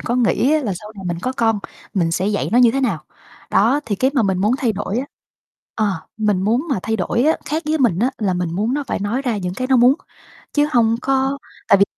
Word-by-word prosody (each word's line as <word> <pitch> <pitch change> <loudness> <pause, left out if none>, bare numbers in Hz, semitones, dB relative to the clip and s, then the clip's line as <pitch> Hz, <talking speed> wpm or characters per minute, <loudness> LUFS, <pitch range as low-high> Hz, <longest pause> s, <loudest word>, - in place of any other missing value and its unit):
có 240 - -1
nghĩ 250 +3 +2
á, 310 - +3
là 215 -6 -1
sau 210 +4 -9
này 195 - -8
mình 175 -1 -2
có 255 - -1
con 225 -4 +1 0.4
mình 170 -4 +1
sẽ 185 +3 0
dạy 205 -1 0
nó 240 - +5
như 245 -2 +6
thế 270 +4 -1
nào. 195 - -1 0.5
Đó, 240 +8 +3
thì 205 - -1
cái 260 +6 +2
mà 265 - +3
mình 190 -3 +1
muốn 210 +4 +2
thay 240 -5 +1
đổi 205 +2 -3
á, 265 - -3 0.7
ờ, 215 - +1 0.3
mình 210 -4 +1
muốn 235 - +1
mà 255 - +1
thay 225 0 -1
đổi 215 +4 0
á, 315 +2 +3
khác 315 +2 -2
với 310 +1 +1
mình 235 -10 +2
á, 245 +6 +2
là 195 -4 0
mình 180 -2 -2
muốn 215 +7 0
nó 290 0 -2
phải - - -2
nói 215 +7 -1
ra 245 -5 -1
những 180 -2 -3
cái 255 - -2
nó 260 0 +4
muốn 245 +2 +6 0.6
chứ 295 0 +2
hông 230 -2 +3
có 270 +1 +1 0.3
tại 200 - +6
vì 200 - +6
225 Hz, 260 wpm, -20 LUFS, 200-260 Hz, 0.7 s, như